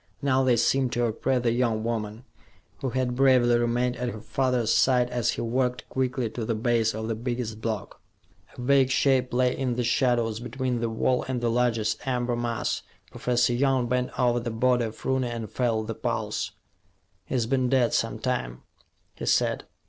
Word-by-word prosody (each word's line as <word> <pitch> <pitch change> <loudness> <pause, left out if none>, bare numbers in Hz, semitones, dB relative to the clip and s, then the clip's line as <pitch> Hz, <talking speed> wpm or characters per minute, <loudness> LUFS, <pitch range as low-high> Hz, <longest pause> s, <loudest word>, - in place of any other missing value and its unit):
Now, 135 -2 +2
they 125 -2 +3
seemed 130 +2 +2
to 120 0 +1
oppress 125 +3 0
the 115 - +2
young 115 -2 0
woman, 110 0 -3 0.6
who 135 - -2
had 125 0 -1
bravely 125 -2 +4
remained 120 +1 0
at 125 0 -2
her 110 - -7
father's 125 0 0
side 125 -1 +3
as 120 -3 0
he - - -4
walked 125 +2 -1
quickly 130 -2 -1
to 120 - -4
the 115 +1 -1
base 115 -1 +1
of 110 0 -4
the 115 - -1
biggest 115 -1 -4
block. 110 -3 -4 0.6
A - - -6
vague 135 +1 +4
shape 130 -1 +2
lay 125 0 +2
in 130 -3 -1
the 125 - -1
shadows 120 -2 +1
between 125 0 -2
the 115 0 -1
wall 125 +3 +1
and 130 -1 -1
the 120 -1 0
largest 115 -3 +1
amber 125 -1 0
mass. 120 -1 -2 0.3
Professor 120 0 +1
Young 130 -1 +2
bent 125 0 0
over 120 -1 +3
the 120 0 -4
body 120 +1 +2
of 110 - -8
Rooney, 130 -1 +1
and 115 -2 -5
felt 115 -3 0
the 115 - -4
pulse. - - -2 0.8
"He's 120 -3 0
been 130 +1 +1
dead 125 -3 +2
some - - 0
time," - - -3 0.5
he - - -5
said. - - +1
120 Hz, 185 wpm, -26 LUFS, 115-125 Hz, 0.8 s, bravely